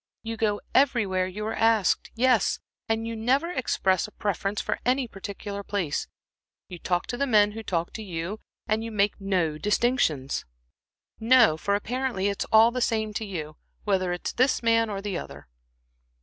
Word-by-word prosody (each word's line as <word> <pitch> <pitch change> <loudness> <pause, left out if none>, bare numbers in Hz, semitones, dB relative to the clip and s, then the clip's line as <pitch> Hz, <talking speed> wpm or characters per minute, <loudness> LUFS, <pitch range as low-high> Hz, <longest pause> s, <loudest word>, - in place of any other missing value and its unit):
You 225 0 -4
go 210 -2 0
everywhere 205 -9 +2
you 210 +3 -5
are 220 - -2
asked 225 -4 +2
yes, 240 -3 +3 0.3
and 225 0 0
you 230 0 -4
never 265 +9 +1
express 190 - +1
a - - -14
preference 200 0 -2
for - - -2
any 255 +1 +1
particular 200 0 -6
place; 195 -7 -2 0.6
you 180 - -9
talk 175 0 -1
to 245 - -4
the 280 +2 0
men 210 -4 +4
who 225 +2 -7
talk 170 -5 -2
to 220 - -6
you, 185 +1 -5 0.3
and 220 0 0
you 230 - -5
make 205 -1 0
no 175 -6 0
distinctions 210 - +1 0.8
no, 230 -6 +5
for 200 +5 0
apparently 235 -2 -1
it's 200 - -2
all 220 +2 +6
the 250 +1 -3
same 220 -2 0
to 220 - -3
you, 155 -5 -6 0.3
whether 185 -3 +1
it's 175 - -3
this 255 0 +2
man 230 -1 +3
or 200 -1 -4
the 200 -4 -2
other." - - -10
210 Hz, 175 wpm, -26 LUFS, 190-230 Hz, 0.8 s, all